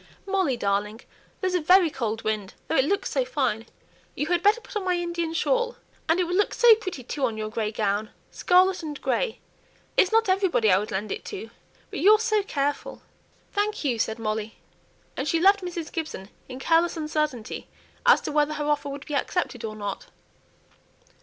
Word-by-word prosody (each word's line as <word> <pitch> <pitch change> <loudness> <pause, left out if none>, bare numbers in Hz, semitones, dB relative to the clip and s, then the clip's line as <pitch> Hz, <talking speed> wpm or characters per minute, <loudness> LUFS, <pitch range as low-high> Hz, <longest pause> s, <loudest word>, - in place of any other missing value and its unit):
"Molly, 380 -10 +1
darling, 205 +2 -1 0.4
there's 375 -1 0
a 360 - +1
very 355 +1 +5
cold 225 -4 -3
wind, 215 -3 -2
though - - -1
it 265 - +4
looks 400 +6 -1
so - - +1
fine. 255 - -1 0.5
You 295 - -1
had 345 +2 +1
better 415 +4 +4
put 475 - -13
on 420 - -1
my 365 -1 +1
Indian 340 -1 -2
shawl; 485 +8 0 0.3
and 330 +3 +3
it - - +3
will 350 0 -3
look 410 - +1
so 480 -1 +8
pretty, 375 - -4
too, 275 +3 -5
on 230 -4 0
your 215 0 -3
grey 215 -1 -2
gown 210 0 -1 0.2
scarlet 370 +1 +3
and 300 -3 -6
grey; 485 -3 -1 0.6
it's 375 - +4
not 450 0 +3
everybody 375 - +3
I 185 - +5
would 210 - -5
lend 200 +2 -3
it - - -4
to, 225 - -7 0.4
but - - -4
you're 425 +3 +7
so 435 -1 +1
careful." 290 -7 -3 0.5
"Thank 415 -1 -1
you," 250 -6 0
said 220 0 0
Molly: 215 -1 -3 0.6
and 265 - -3
she 330 - +2
left 395 +3 +5
Mrs. 345 -3 -5
Gibson 305 - -5 0.2
in 255 - -7
careless 330 +5 +2
uncertainty 305 -7 -2 0.4
as 485 -1 +6
to - - -4
whether 300 0 +1
her 295 - -3
offer 295 -1 0
would 280 +1 -7
be 295 - -6
accepted 280 -4 -1
or 215 -1 -4
not. 210 - -5
305 Hz, 190 wpm, -25 LUFS, 225-375 Hz, 0.6 s, so